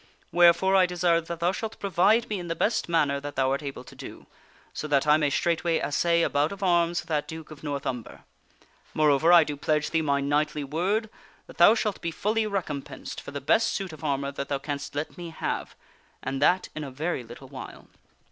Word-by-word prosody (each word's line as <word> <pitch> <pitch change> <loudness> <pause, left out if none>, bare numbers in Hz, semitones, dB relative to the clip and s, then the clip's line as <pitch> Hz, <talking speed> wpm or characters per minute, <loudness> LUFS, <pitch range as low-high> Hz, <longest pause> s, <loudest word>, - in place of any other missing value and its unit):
Wherefore 175 +2 +5
I 185 -1 +5
de 180 0 -6
sire 170 -1 +3
that 165 0 -7
thou 175 +1 +3
shalt 220 +3 -5
provide 200 +4 +3
me 210 -3 -3
in 175 - -6
the 165 - -2
best 215 +2 0
manner 145 -4 +2
that 145 +1 -7
thou 130 0 +1
art 140 - -1
able 140 -3 -6
to - - -14
do, - - -10 0.5
so 155 - -4
that 140 -1 +2
I 150 0 +6
may 150 -2 +1
straightway 170 +2 +1
assay 170 +5 +1
a - - +3
bout 145 +2 +1
of 200 0 -7
arms 175 -2 +2
with - - -18
that 150 -2 0
Duke 160 -1 -9
of 150 - -11
North 140 -2 -3
Umber. 125 -3 -5 0.7
Moreover, 155 +2 +4
I 175 - +8
do 150 - -4
pledge 150 +1 0
thee 160 - +2
my 140 -2 +1
knightly 145 +1 0
word 185 +10 -1 0.4
that - - -15
thou 190 +6 +8
shalt 210 -3 -2
be 170 - -2
fully 215 +6 0
recompensed 170 -9 -5
for - - -9
the 145 0 -5
best 225 +11 +3
suit 190 -4 -4
of 155 - -12
armor 140 -2 -1
that 140 0 -5
thou 140 - 0
canst 145 0 -5
let 150 +4 -4
me 175 -1 -6
have, 160 - -4 0.5
and 135 0 -3
that 185 +1 +3
in 155 - -5
a 140 - -5
very 145 +1 -3
little 120 +3 -12
while." 130 -1 -9
160 Hz, 225 wpm, -26 LUFS, 145-175 Hz, 0.7 s, I